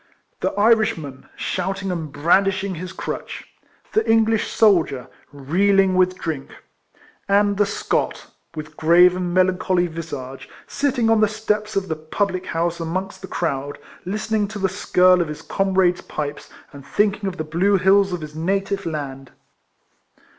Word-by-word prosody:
The - - 0
Irishman, 205 - +1
shouting 190 +1 -3
and 160 -4 -4
brandishing 190 +5 +2
his 180 +2 -6
crutch; - - -6 0.5
the 440 - +3
English 225 -1 +3
soldier, 170 - +2 0.2
reeling 190 +7 +2
with 185 0 +2
drink; 155 -6 -4 0.8
and 205 0 +3
the 205 0 +2
Scot, 200 - -2 0.3
with 155 0 -8
grave 175 +3 +5
and 180 -1 -2
melancholy 185 0 +2
visage, 145 -6 -7 0.2
sitting 255 -5 0
on 225 -1 +4
the 215 - +5
steps 215 0 -2
of 195 -1 0
the 160 - -2
public 185 +4 -2
house 170 +1 -1
amongst 175 +4 -4
the 190 - -7
crowd, 145 -5 -3 0.3
listening 210 +2 -1
to 210 +1 -7
the 190 -1 0
skirl 185 -1 +3
of 170 - -1
his 150 0 -7
comrades' 190 -2 +1
pipes, 145 -1 -5 0.2
and 140 -1 -11
thinking 205 +6 0
of 185 - -9
the 155 - -2
blue 180 +6 +2
hills 195 +1 +4
of 180 -2 -3
his 150 -1 -8
native 195 +3 -1
land. 135 -4 -5
185 Hz, 145 wpm, -21 LUFS, 160-200 Hz, 0.8 s, grave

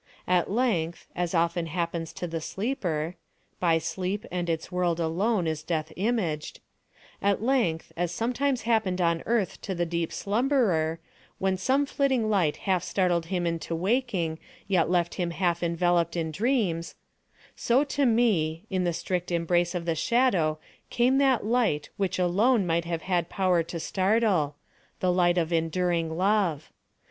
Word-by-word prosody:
At 180 -1 +2
length, 190 -8 0
as 175 0 -1
often 170 0 +1
happens 170 0 -3
to - - -5
the 165 -1 -4
sleeper 180 - -2 0.4
(by 165 -2 +3
sleep 185 +5 -3
and 175 -1 -2
its 160 -1 -2
world 175 -2 0
alone 180 +5 +1
is 160 -1 -2
Death 160 -1 -3
imaged)—at 200 0 -3
length, 230 -11 +1
as 175 0 -1
sometimes 250 +3 -1
happened 220 -5 +1
on 170 -1 +2
Earth 225 -4 0
to 190 - -4
the 175 0 0
deep 170 -1 -2
slumberer, 200 - +1 0.4
when 190 0 +1
some 265 +10 +1
flitting 265 -6 +1
light 175 -8 +2
half 185 -3 +2
startled 175 -4 0
him 180 -1 -1
into 165 0 -2
awaking, 185 -4 0 0.3
yet 180 -5 +2
left 175 -1 +1
him 175 - 0
half 170 -1 0
enveloped 170 0 +1
in 160 -1 -1
dreams—so 225 - -2
to 285 0 -1
me, 210 - +2
in 185 -1 0
the 175 - +1
strict 180 +1 -3
embrace 175 +1 +1
of 170 -1 -3
the 165 - +1
Shadow 170 -4 +2 0.3
came 255 +3 +3
that 265 -6 +3
light 220 -11 +1
which 190 -2 -1
alone 200 +5 +3
might 170 0 0
have 165 -1 -3
had 175 -2 0
power 185 -3 +2
to 170 +1 -5
startle—the 185 -3 -1
light 175 -1 +3
of 170 -1 0
enduring 165 0 0
Love. 185 -6 +1
180 Hz, 150 wpm, -27 LUFS, 165-210 Hz, 0.4 s, by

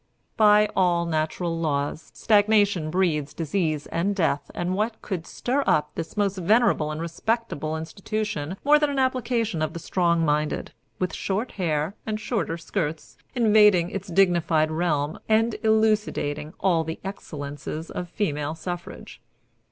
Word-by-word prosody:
"By 210 -1 +6
all 175 -2 +2
natural 165 +1 -1
laws, 145 -1 -2
stagnation 205 -6 +3
breeds 155 -5 0
disease 160 -2 -1
and 195 +4 -1
death, 160 -6 0
and 175 +1 -1
what 220 +3 -1
could 180 -5 -4
stir 270 +3 -1
up 150 - +2
this 165 +5 -6
most 200 -1 +1
venerable 205 -4 +3
and 155 0 -4
respectable 165 -2 -2
institution 190 0 -4
more 295 +1 +6
than 295 -1 +2
an 280 - -3
application 245 -8 0
of 155 0 -1
the 170 - -5
strong 170 -1 +1
minded, 150 0 0 0.3
with 185 - -2
short 205 +6 -2
hair 160 -2 -1
and 215 -1 -3
shorter 210 -7 -2
skirts, 165 -2 -4 0.2
invading 210 -6 +5
its 195 +1 -5
dignified 170 -4 +2
realm 155 -3 -1
and 225 +1 +3
elucidating 215 -9 +1
all 175 -4 +2
the 160 0 -5
excellences 155 -4 -6
of 175 -1 -5
female 150 -6 -2
suffrage. 175 +1 -7
175 Hz, 140 wpm, -25 LUFS, 155-210 Hz, 0.3 s, By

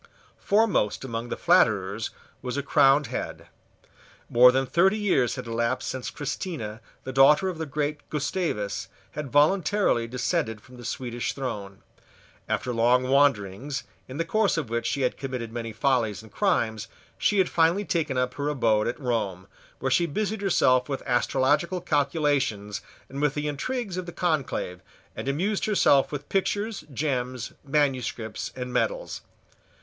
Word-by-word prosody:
Foremost 200 - +2
among 115 -1 -4
the - - -3
flatterers - - +2 0.3
was 125 +2 -4
a 140 - -1
crowned 140 +1 +4
head. - - -5 0.8
More 125 +1 +8
than 135 +1 +1
thirty 190 - +3
years 185 - +2
had - - -6
elapsed 115 +2 -1
since 130 -1 -4
Christina, 135 - -5 0.2
the 130 - -6
daughter 150 +8 +6
of 175 -3 -6
the 160 - -3
great 150 +1 -3
Gustavus, 140 - -2 0.2
had 150 -2 -5
voluntarily 155 - +3
descended 125 -1 -1
from 125 +3 -16
the 120 - -10
Swedish 120 -2 -3
throne. 105 -8 -5 0.7
After 125 - -1
long 125 +2 +3
wanderings, 135 -1 +1 0.2
in 130 - -7
the 165 - 0
course 215 +1 +2
of 140 -8 -3
which 115 0 -1
she 140 - -1
had 125 - 0
committed 125 -4 -5
many 115 -1 -4
follies 110 -4 0
and 110 - -15
crimes, 115 - 0 0.3
she 210 - +2
had 190 -2 +4
finally 170 +5 +2
taken 155 -8 -1
up 125 0 0
her 145 +1 -2
abode 115 -7 +2
at 120 - -3
Rome, 110 -8 -2 0.3
where 130 0 -2
she 170 +6 +3
busied 210 +6 -2
herself 130 -9 +3
with 135 - -3
astrological 135 +8 +1
calculations 140 - 0 0.3
and 140 +2 -6
with 145 -1 +1
the 150 0 -2
intrigues 195 - -3
of 185 -1 -4
the - - -5
conclave, 145 - -1 0.3
and - - -6
amused 185 +9 0
herself 170 -10 +4
with 145 -2 -5
pictures, 205 +2 -1
gems, 130 -3 -2
manuscripts, 130 -6 -1
and 125 -1 -5
medals. - - -1
135 Hz, 155 wpm, -26 LUFS, 120-160 Hz, 0.8 s, More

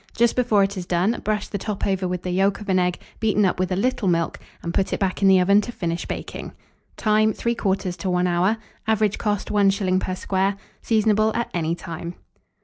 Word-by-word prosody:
Just 235 0 +3
before 230 -5 +3
it 195 0 -2
is 180 -1 -5
done, 185 +6 +1
brush 210 -1 -1
the 200 - -4
top 210 0 -3
over 190 -2 0
with 180 0 -3
the 180 - -2
yolk 195 +2 +2
of 210 -1 -9
an 185 -1 +3
egg 180 -1 0 0.2
beaten 210 -2 +2
up 185 - 0
with 185 0 0
a - - +1
little 220 0 0
milk, 170 -2 0 0.2
and 170 - -3
put 190 - 0
it - - -1
back 190 -1 -1
in 195 - +5
the 190 -1 +6
oven 200 +3 +5
to 240 - -6
finish 170 -6 -3
baking. - - -6 0.4
Time. 215 0 +3
3/4 195 -6 -1
to 185 +3 -3
1 180 0 +1
hour. 180 +5 +2 0.3
Average 215 -2 +1
cost, 205 -2 -1
1s. 195 -2 +2
per 185 -1 -3
square. 195 +1 0 0.2
Seasonable 215 -1 +2
at 235 - -2
any 165 -1 0
time. 170 0 -7
195 Hz, 215 wpm, -23 LUFS, 180-210 Hz, 0.4 s, the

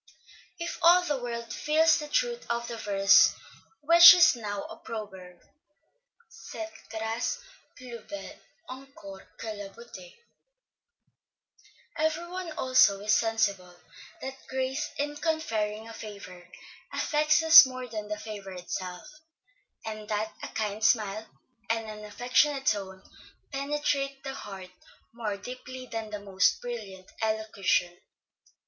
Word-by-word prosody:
If 340 0 -5
all 350 +2 +6
the 290 -7 -2
world 235 -1 -5
feels 315 +2 +3
the 300 - -6
truth 485 +5 -1
of 235 0 -2
the 235 - -6
verse 195 -2 +5 0.5
which 340 +3 +10
is 350 -6 +6
now 205 -3 -5
a - - -9
proverb, 190 -5 -9 0.9
Cette 330 0 -9 0.2
grâce 225 - -2 0.4
plus 240 -3 -9
belle 300 0 -8 0.3
encors 255 -7 -11 0.2
que 225 - -5
la 205 -1 -8
beauté, 195 -5 -13 1.8
every 315 +2 -1
one 360 -1 -6
also 255 -8 +4
is 215 +1 +1
sensible, 200 -6 0 0.5
that 265 - -4 0.2
grace 265 +3 -2
in 290 +1 -3
conferring 225 -10 -2
a 230 - -9
favor, 200 -5 -10 0.4
affects 305 +1 +2
us 320 -4 +10
more 255 -1 -7
than 215 -3 -6
the 210 0 -4
favor 205 -3 -8
itself, 180 0 -6 0.8
and 215 -1 -7
that 215 +1 -2
a - - -5
kind 215 0 -4
smile, 215 -1 +1 0.4
and 225 0 0
an 215 0 -8
affectionate 265 +6 +1
tone, 190 -2 -1 0.5
penetrate 275 -1 -2
the 270 -1 -5
heart 195 -7 -9 0.4
more 220 -4 -4
deeply 255 +3 -9
than 225 -3 -6
the 210 -1 -5
most 195 -1 +1
brilliant 205 -6 -7
elocution. 215 -5 0
225 Hz, 125 wpm, -28 LUFS, 205-275 Hz, 1.8 s, which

